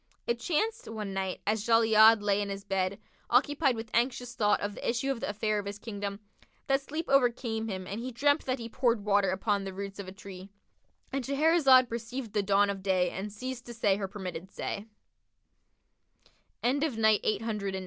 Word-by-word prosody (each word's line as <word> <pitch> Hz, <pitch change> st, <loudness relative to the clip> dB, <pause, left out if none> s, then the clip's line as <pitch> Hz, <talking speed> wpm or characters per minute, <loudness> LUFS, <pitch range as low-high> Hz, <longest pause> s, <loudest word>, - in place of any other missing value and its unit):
It 235 Hz, 0 st, -1 dB
chanced, 435 Hz, -, -1 dB
one 210 Hz, -3 st, -5 dB
night, 190 Hz, -1 st, -3 dB
as 215 Hz, 0 st, 0 dB
Jali'ad[FN#59] 225 Hz, -1 st, +6 dB
lay 205 Hz, 0 st, +2 dB
in 200 Hz, -, -3 dB
his 195 Hz, 0 st, -5 dB
bed, 195 Hz, -1 st, -1 dB, 0.3 s
occupied 275 Hz, +1 st, +3 dB
with 225 Hz, 0 st, -7 dB
anxious 245 Hz, 0 st, 0 dB
thought 210 Hz, -4 st, +2 dB
of 205 Hz, 0 st, -3 dB
the -, -, -3 dB
issue 250 Hz, +4 st, 0 dB
of 265 Hz, -, -3 dB
the -, -, -3 dB
affair 210 Hz, +1 st, 0 dB
of 200 Hz, -, -6 dB
his 200 Hz, 0 st, -5 dB
Kingdom, 205 Hz, -2 st, -5 dB, 0.5 s
that 270 Hz, 0 st, +2 dB
sleep 310 Hz, +4 st, -5 dB
overcame 240 Hz, -4 st, +1 dB
him 190 Hz, -3 st, -4 dB
and 200 Hz, +5 st, -5 dB
he 255 Hz, +2 st, -4 dB
dreamt 285 Hz, +5 st, +2 dB
that 255 Hz, 0 st, -1 dB
he 230 Hz, -2 st, -6 dB
poured 235 Hz, -3 st, 0 dB
water 200 Hz, -2 st, +3 dB
upon 200 Hz, +2 st, 0 dB
the 195 Hz, -1 st, -6 dB
roots 200 Hz, 0 st, -6 dB
of 200 Hz, -, -6 dB
a -, -, -7 dB
tree,—And 200 Hz, +7 st, -10 dB
Shahrazad 275 Hz, -2 st, +5 dB
perceived 235 Hz, 0 st, -5 dB
the 210 Hz, -, +2 dB
dawn 200 Hz, 0 st, +3 dB
of 195 Hz, -1 st, -6 dB
day 185 Hz, -2 st, +1 dB
and 200 Hz, +3 st, -5 dB
ceased 250 Hz, +4 st, -6 dB
to 240 Hz, -, -8 dB
say 205 Hz, -4 st, +2 dB
her 200 Hz, -2 st, -3 dB
permitted 185 Hz, -2 st, -7 dB
say. 200 Hz, +1 st, -5 dB
220 Hz, 180 wpm, -29 LUFS, 200-245 Hz, 0.5 s, Jali'ad[FN#59